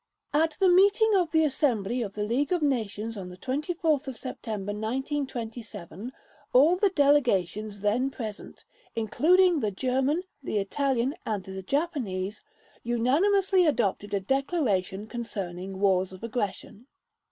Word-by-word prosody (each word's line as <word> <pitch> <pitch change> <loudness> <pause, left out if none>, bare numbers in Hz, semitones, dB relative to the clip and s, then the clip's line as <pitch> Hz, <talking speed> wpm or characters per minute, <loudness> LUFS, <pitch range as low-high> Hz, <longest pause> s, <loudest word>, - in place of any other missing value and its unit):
At 315 +1 +2
the 385 - +5
meeting 405 +4 +5
of 360 -4 +2
the 320 0 +3
Assembly 250 -6 0
of 200 -4 -4
the 210 - -2
League 255 +8 0
of 350 -3 +1
Nations 225 -5 -1
on 190 -3 -6
24 300 - -1
September 235 -6 -5
1927, 225 - -4 0.4
all 295 +8 +6
the 395 +2 +3
delegations 215 - +2
then 230 +6 +1
present 220 -6 -8 0.3
(including 335 - +3
the 215 - 0
German, 265 - 0 0.2
the 240 - -2
Italian, 260 +5 0
and 210 -3 -2
the 190 0 -7
Japanese), 215 - -2 0.4
unanimously 355 - +3
adopted 205 -6 0
a - - +1
declaration 210 - 0
concerning 195 -5 -5
wars 190 -2 +2
of 185 +2 -12
aggression. 230 0 -4
240 Hz, 125 wpm, -27 LUFS, 205-295 Hz, 0.4 s, all